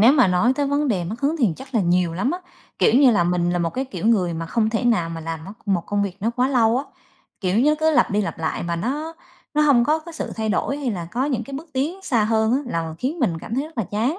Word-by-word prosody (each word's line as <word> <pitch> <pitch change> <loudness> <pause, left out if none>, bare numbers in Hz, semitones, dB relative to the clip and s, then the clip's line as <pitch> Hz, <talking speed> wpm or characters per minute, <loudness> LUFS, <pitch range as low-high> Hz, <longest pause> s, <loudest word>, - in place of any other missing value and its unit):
nếu 235 +5 +7
mà 260 -7 +5
nói 180 +8 +3
tới 285 - +1
vấn 285 +1 0
đề 190 -7 0
mất 215 +8 -6
hứng 290 +4 +1
thì 240 -7 +3
chắc 265 0 -12
là 225 - +3
nhiều 175 -2 +1
lắm 195 +10 0
á, 355 - -2 0.4
kiểu - - +4
như 270 -3 +7
là 205 -7 +3
mình 175 0 +1
là 175 - 0
một 170 -1 0
cái 260 +7 -2
kiểu 255 -5 -5
người 185 -7 +2
mà 165 0 -4
không 220 +4 0
thể 225 +2 -1
nào 210 -9 +2
mà 165 0 -5
làm 160 0 -5
mốt 195 - -9
một 190 -4 +1
công 205 0 0
việc 195 -3 -3
nó 225 +4 0
quá 250 +2 +1
lâu 240 -3 +3
á, 275 - -3 0.6
kiểu 185 +2 +1
nó 295 +5 +4
cứ 315 0 +4
lặp 305 - +3
đi 205 +1 +1
lặp 200 - -4
lại 160 -1 -2
mà 170 0 -2
nó 295 - -3 0.4
nó 300 - +3
hông 275 -5 +5
có 305 +5 +2
cái 330 +2 -11
sự 320 - -5
thay 220 -1 -2
đổi 270 +6 0
hay 280 -4 -2
là 175 -5 -5
có 250 +4 0
những 255 -5 -1
cái 275 - -8
bước 310 +4 -8
tiến 300 +9 -2
xa 235 - +1
hơn 220 +1 +2
á, 260 - +3
là 165 -8 -3
khiến 285 +7 -2
mình 180 - 0
cảm 220 - -6
thấy 270 +3 0
rất 315 -4 -11
là 225 - +1
chán. 235 - 0
230 Hz, 300 wpm, -22 LUFS, 180-275 Hz, 0.6 s, nếu